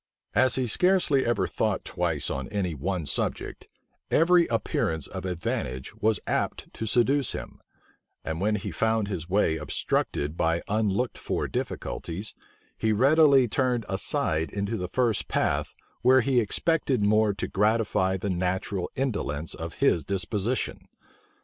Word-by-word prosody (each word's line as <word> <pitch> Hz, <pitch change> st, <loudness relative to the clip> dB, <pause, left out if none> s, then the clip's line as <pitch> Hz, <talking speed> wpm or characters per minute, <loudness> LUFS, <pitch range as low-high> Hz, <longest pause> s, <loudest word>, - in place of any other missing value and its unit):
As 130 Hz, 0 st, +4 dB
he 130 Hz, -, 0 dB
scarcely 165 Hz, -, +3 dB
ever 120 Hz, -, +1 dB
thought -, -, -1 dB
twice -, -, -1 dB
on 65 Hz, -1 st, -4 dB
any 100 Hz, -5 st, -1 dB
one 85 Hz, +3 st, -2 dB
subject, -, -, -3 dB, 0.4 s
every 170 Hz, +1 st, +4 dB
appearance 80 Hz, -, -1 dB
of -, -, -6 dB
advantage 65 Hz, -7 st, -3 dB
was 110 Hz, 0 st, +1 dB
apt -, -, -2 dB
to 110 Hz, -, -4 dB
seduce 130 Hz, +4 st, +2 dB
him; -, -, -8 dB, 0.6 s
and 80 Hz, +2 st, -3 dB
when 105 Hz, +2 st, +2 dB
he 100 Hz, -1 st, -4 dB
found 110 Hz, +4 st, +1 dB
his 85 Hz, -3 st, -4 dB
way 90 Hz, -5 st, +2 dB
obstructed 75 Hz, -1 st, -1 dB
by 85 Hz, 0 st, 0 dB
unlooked 110 Hz, +3 st, 0 dB
for -, -, -2 dB
difficulties, 85 Hz, -, -4 dB, 0.5 s
he 110 Hz, -, +1 dB
readily 135 Hz, +3 st, +5 dB
turned 125 Hz, -1 st, 0 dB
aside 80 Hz, -4 st, 0 dB
into 100 Hz, +2 st, -2 dB
the 90 Hz, -4 st, -4 dB
first 120 Hz, -2 st, 0 dB
path, -, -, 0 dB, 0.3 s
where 130 Hz, +2 st, +6 dB
he 130 Hz, 0 st, +2 dB
expected 130 Hz, 0 st, +1 dB
more 105 Hz, 0 st, +4 dB
to -, -, -3 dB
gratify 105 Hz, -2 st, +1 dB
the 95 Hz, +1 st, -2 dB
natural 95 Hz, +1 st, -1 dB
indolence 90 Hz, -, -2 dB
of 80 Hz, 0 st, -7 dB
his 85 Hz, -, +2 dB
disposition. 100 Hz, +5 st, -2 dB
105 Hz, 140 wpm, -27 LUFS, 90-125 Hz, 0.6 s, where